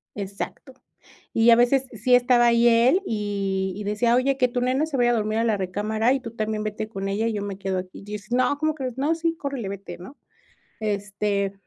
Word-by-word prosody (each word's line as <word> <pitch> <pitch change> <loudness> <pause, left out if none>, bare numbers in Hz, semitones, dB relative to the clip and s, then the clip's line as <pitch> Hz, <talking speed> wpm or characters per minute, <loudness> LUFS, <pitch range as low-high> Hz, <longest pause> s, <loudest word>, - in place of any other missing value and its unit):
Exacto. 200 +6 -6 0.6
Y 230 +1 +4
a 230 - +9
veces 250 +3 +3
sí 245 +3 +3
estaba 245 -1 +4
ahí 235 0 +4
él 240 +10 +4
y 195 - -2
y 210 - -6
decía: 220 +4 +1
"Oye, 265 +2 +2
que 250 -2 +3
tu 245 0 -3
nena 260 +5 +1
se 310 -3 -5
vaya 240 0 +3
a - - +2
dormir 215 -1 0
a - - +2
la 220 -3 +1
recámara, 215 +5 0
y 270 - 0
tú 230 - -7
también 215 -1 -3
vete 215 0 -4
con 195 -2 -5
ella, 215 +3 0
y 230 - -1
yo 205 - -3
me 200 -1 -5
quedo 190 -1 -2
aquí". 185 +1 -9
Yo 205 +1 -9
decía: 215 +4 -3
"No, 270 +3 +2
¿cómo 310 +1 0
crees?" 260 -4 -5
'No, 295 +5 +1
sí, 330 0 -1
córrele, 275 -8 -4
vete, 200 0 -7
¿no?'". 190 +11 -12 0.6
Este, 205 -1 -1
225 Hz, 225 wpm, -24 LUFS, 205-250 Hz, 0.6 s, a